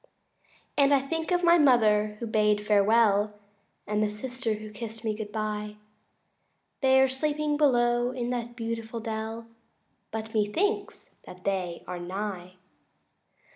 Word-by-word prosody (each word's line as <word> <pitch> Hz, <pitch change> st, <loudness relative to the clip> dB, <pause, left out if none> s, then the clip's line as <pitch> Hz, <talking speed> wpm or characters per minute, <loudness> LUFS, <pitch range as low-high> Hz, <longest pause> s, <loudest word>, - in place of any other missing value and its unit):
III -, -, -36 dB, 0.3 s
And 280 Hz, +1 st, +4 dB
I 270 Hz, -, +2 dB
think 320 Hz, +4 st, -3 dB
of 355 Hz, -1 st, +1 dB
my 340 Hz, 0 st, +6 dB
mother 215 Hz, -6 st, +4 dB
who 235 Hz, -, -4 dB
bade 210 Hz, -1 st, +2 dB
me 210 Hz, -, -8 dB
farewell 210 Hz, 0 st, +3 dB, 0.5 s
And 210 Hz, 0 st, -1 dB
the 215 Hz, -, +2 dB
sister 240 Hz, +2 st, -3 dB
who 215 Hz, 0 st, -9 dB
kist 225 Hz, +1 st, -7 dB
me 215 Hz, -, +1 dB
good 210 Hz, -1 st, -6 dB
bye 210 Hz, -1 st, -3 dB, 1.0 s
They 265 Hz, -1 st, +5 dB
are 265 Hz, -, +5 dB
sleeping 295 Hz, +3 st, -1 dB
below 240 Hz, -4 st, +3 dB
in 250 Hz, -1 st, -3 dB
that 240 Hz, -1 st, -4 dB
beautiful 230 Hz, -1 st, -4 dB
dell 225 Hz, 0 st, -5 dB, 0.6 s
But 220 Hz, 0 st, -6 dB
methinks 370 Hz, -, -1 dB, 0.2 s
that 180 Hz, -, -11 dB
again -, -, -25 dB
they 185 Hz, -3 st, -2 dB
are 180 Hz, -, -5 dB
nigh. 185 Hz, 0 st, -5 dB
225 Hz, 150 wpm, -27 LUFS, 210-255 Hz, 1.0 s, my